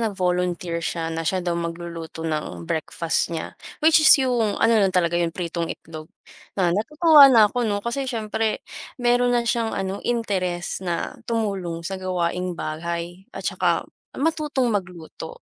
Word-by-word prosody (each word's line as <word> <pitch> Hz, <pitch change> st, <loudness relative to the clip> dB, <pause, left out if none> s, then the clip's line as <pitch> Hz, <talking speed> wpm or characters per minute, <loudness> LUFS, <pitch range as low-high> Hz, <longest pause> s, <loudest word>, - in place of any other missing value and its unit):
nag 220 Hz, -4 st, -1 dB
volunteer 180 Hz, -2 st, -1 dB
siya 165 Hz, 0 st, -3 dB
na 165 Hz, -, -3 dB
siya 185 Hz, -2 st, -1 dB
daw 175 Hz, -, 0 dB
magluluto 170 Hz, -1 st, -6 dB
ng 150 Hz, -, -3 dB
breakfast 160 Hz, -, -1 dB
niya. 160 Hz, -, -5 dB, 0.3 s
Which 315 Hz, 0 st, +7 dB
is 310 Hz, -, +6 dB
yung 245 Hz, -6 st, +1 dB
ano 225 Hz, -, +3 dB
lang 195 Hz, -2 st, +2 dB
talaga 170 Hz, -1 st, +2 dB
yun 170 Hz, -1 st, -1 dB
pritong 170 Hz, -1 st, -3 dB
itlog. 155 Hz, -2 st, -8 dB, 0.5 s
Na 180 Hz, -3 st, +2 dB
natutuwa 295 Hz, -, +6 dB
na 230 Hz, -5 st, +7 dB
ako 245 Hz, 0 st, -1 dB
'no? 205 Hz, -1 st, -2 dB
Kasi 260 Hz, +3 st, -2 dB
siyempre 220 Hz, -2 st, -2 dB, 0.3 s
meron 245 Hz, 0 st, +2 dB
na 240 Hz, -, +1 dB
siyang 230 Hz, -1 st, 0 dB
ano, 195 Hz, +1 st, -3 dB
interest 185 Hz, -8 st, -2 dB
na 175 Hz, -3 st, -3 dB, 0.2 s
tumulong 195 Hz, -7 st, -2 dB
sa 190 Hz, +2 st, -4 dB
gawaing 180 Hz, -1 st, -2 dB
bahay, 170 Hz, +4 st, -5 dB
at -, -, -7 dB
saka -, -, +1 dB, 0.3 s
matutong 295 Hz, -5 st, 0 dB
magluto. 180 Hz, -, -5 dB
185 Hz, 155 wpm, -23 LUFS, 170-235 Hz, 0.5 s, Which